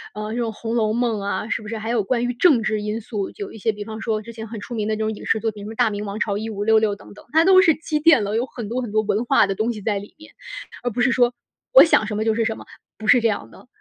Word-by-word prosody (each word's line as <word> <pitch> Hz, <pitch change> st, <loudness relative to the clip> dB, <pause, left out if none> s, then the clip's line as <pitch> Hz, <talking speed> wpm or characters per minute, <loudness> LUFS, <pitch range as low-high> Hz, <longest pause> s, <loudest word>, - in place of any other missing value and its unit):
呃， 210 Hz, 0 st, -5 dB
这 240 Hz, -, -3 dB
种 230 Hz, -2 st, -1 dB
《红 225 Hz, +1 st, -5 dB
楼 215 Hz, -2 st, +1 dB
梦》 235 Hz, -2 st, 0 dB
啊， 200 Hz, +2 st, -3 dB
是 -, -, -1 dB
不 215 Hz, -, -10 dB
是 225 Hz, +1 st, -4 dB
还 220 Hz, +1 st, -5 dB
有 230 Hz, -3 st, +1 dB
关 240 Hz, +4 st, 0 dB
于 245 Hz, -, -1 dB
政 255 Hz, -3 st, +4 dB
治 215 Hz, 0 st, -1 dB
因 210 Hz, +2 st, -3 dB
素， 205 Hz, -3 st, -4 dB
有 405 Hz, -1 st, -7 dB
一 -, -, -11 dB
些 225 Hz, +2 st, +1 dB
比 205 Hz, 0 st, -7 dB
方 220 Hz, +1 st, -8 dB
说 215 Hz, -2 st, -1 dB
之 230 Hz, +2 st, -10 dB
前 220 Hz, -1 st, -8 dB
很 225 Hz, -1 st, -7 dB
出 240 Hz, -, -8 dB
名 215 Hz, -2 st, -2 dB
的 215 Hz, -, 0 dB
这 -, -, -7 dB
种 220 Hz, 0 st, -1 dB
影 -, -, -10 dB
视 220 Hz, -, +2 dB
作 225 Hz, +1 st, -1 dB
品， 205 Hz, -1 st, -11 dB
什 -, -, -7 dB
么 225 Hz, -, -7 dB
《大 -, -, +3 dB
明 205 Hz, 0 st, -4 dB
王 200 Hz, +1 st, -5 dB
朝 205 Hz, -3 st, -1 dB
一 220 Hz, +1 st, -4 dB
五 205 Hz, -1 st, -4 dB
六 220 Hz, +1 st, +5 dB
六》 215 Hz, -2 st, +1 dB
等 200 Hz, -, -15 dB
等， 205 Hz, -, -15 dB
它 325 Hz, +1 st, +5 dB
都 375 Hz, 0 st, +7 dB
是 325 Hz, -5 st, +4 dB
积 310 Hz, -1 st, -2 dB
淀 300 Hz, -8 st, +5 dB
了， 205 Hz, +2 st, -2 dB
有 240 Hz, +3 st, +1 dB
很 235 Hz, -4 st, -7 dB
多 240 Hz, +4 st, -2 dB
很 235 Hz, -4 st, -5 dB
多 215 Hz, +1 st, +2 dB
文 215 Hz, +3 st, -1 dB
化 270 Hz, -3 st, +4 dB
的 195 Hz, -, -2 dB
东 220 Hz, +5 st, -1 dB
西 210 Hz, -, -8 dB
在 205 Hz, -1 st, -1 dB
里 205 Hz, -, -13 dB
面， 310 Hz, 0 st, -15 dB, 0.5 s
而 245 Hz, -, 0 dB
不 245 Hz, +2 st, -3 dB
是 250 Hz, +1 st, +3 dB
说 245 Hz, 0 st, +3 dB, 0.4 s
我 -, -, +10 dB
想 270 Hz, -9 st, +3 dB
什 210 Hz, -2 st, -3 dB
么 215 Hz, -, 0 dB
就 225 Hz, -, +2 dB
是 225 Hz, 0 st, 0 dB
什 220 Hz, -, -2 dB
么， -, -, -11 dB, 0.3 s
不 220 Hz, -, -9 dB
是 235 Hz, +2 st, +5 dB
这 230 Hz, -, +3 dB
样 210 Hz, -2 st, -3 dB
的。 -, -, -17 dB
220 Hz, 365 characters per minute, -22 LUFS, 210-240 Hz, 0.5 s, 我